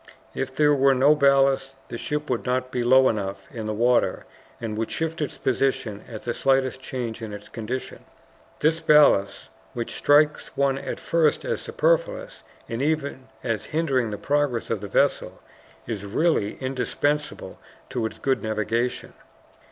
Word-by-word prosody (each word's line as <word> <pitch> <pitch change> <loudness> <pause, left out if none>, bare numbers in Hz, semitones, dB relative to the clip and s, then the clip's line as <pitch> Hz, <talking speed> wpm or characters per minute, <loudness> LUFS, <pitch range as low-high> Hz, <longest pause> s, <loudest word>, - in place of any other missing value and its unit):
If 130 0 -4
there 150 +1 +4
were 135 -1 +4
no 140 +4 +5
ballast, 135 -2 +3
the 120 - -5
ship 150 0 -3
would - - -1
not 130 0 -1
be 125 - -1
low 130 +2 +6
enough 100 -3 -3
in 110 -2 -5
the - - -1
water, 120 +2 +2 0.3
and 110 -2 -4
would 110 +1 -2
shift 165 0 -3
its 150 - -3
position 125 -5 -1
at 110 -3 -8
the 120 - -2
slightest 135 0 +1
change 120 -4 -5
in 110 -2 -6
its 105 0 -9
conditions. 120 +3 -5 0.6
This 160 +2 +3
ballast, 120 -12 +4 0.2
which 120 -1 -4
strikes 150 +1 +2
one 135 -1 +2
at - - -5
first 165 -3 +1
as 485 -1 -2
superfluous - - 0 0.3
and 115 +2 -4
even 140 -3 -1 0.2
as 115 -3 -2
hindering 135 -7 0
the 105 - -4
progress 145 -3 0
of 110 -3 -1
the 100 - -5
vessel, 100 - +1 0.5
is 110 -4 -4
really 105 0 0
indispensable 140 +3 -2 0.3
to 115 -3 -1
its - - -11
good 135 -1 0
navigation. 110 +3 -2
130 Hz, 160 wpm, -24 LUFS, 115-150 Hz, 0.6 s, low